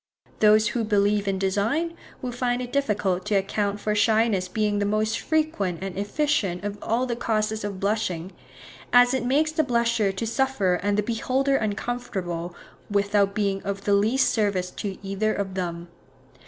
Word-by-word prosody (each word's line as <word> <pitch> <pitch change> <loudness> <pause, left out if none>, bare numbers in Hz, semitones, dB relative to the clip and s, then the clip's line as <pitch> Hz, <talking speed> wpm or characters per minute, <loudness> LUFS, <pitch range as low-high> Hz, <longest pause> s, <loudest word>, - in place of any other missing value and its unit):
Those 215 0 +5
who 230 +2 -1
believe 205 -1 +2
in 195 -1 0
design, 215 - 0 0.3
will 250 - -2
find 245 0 -1
it 250 -1 -6
difficult 205 -9 0
to 210 -1 0
account 200 +1 0
for 210 +1 -1
shyness 215 -3 +2
being 210 +1 0
the 205 - +1
most 215 +2 0
frequent 255 - -1
and 195 -2 -5
efficient 205 - 0
of 205 0 -4
all 235 +3 0
the 240 -2 -2
causes 220 -2 -1
of 200 -2 -4
blushing, 195 -4 -1 0.6
as 245 +1 +6
it 260 -3 0
makes 290 +5 +2
the 315 0 +1
blusher 235 -5 +1
to 195 +4 -4
suffer 225 -7 +1
and 205 +1 0
the 210 - +2
beholder 260 +5 0
uncomfortable, 200 -6 -3 0.3
without 200 0 +2
being 200 -2 0
of 200 0 -4
the 205 - +2
least 220 +7 +3
service 200 -5 0
to 195 -2 -5
either 205 +3 0
of 195 -1 -3
them. 175 -2 -4
210 Hz, 165 wpm, -25 LUFS, 195-235 Hz, 0.6 s, as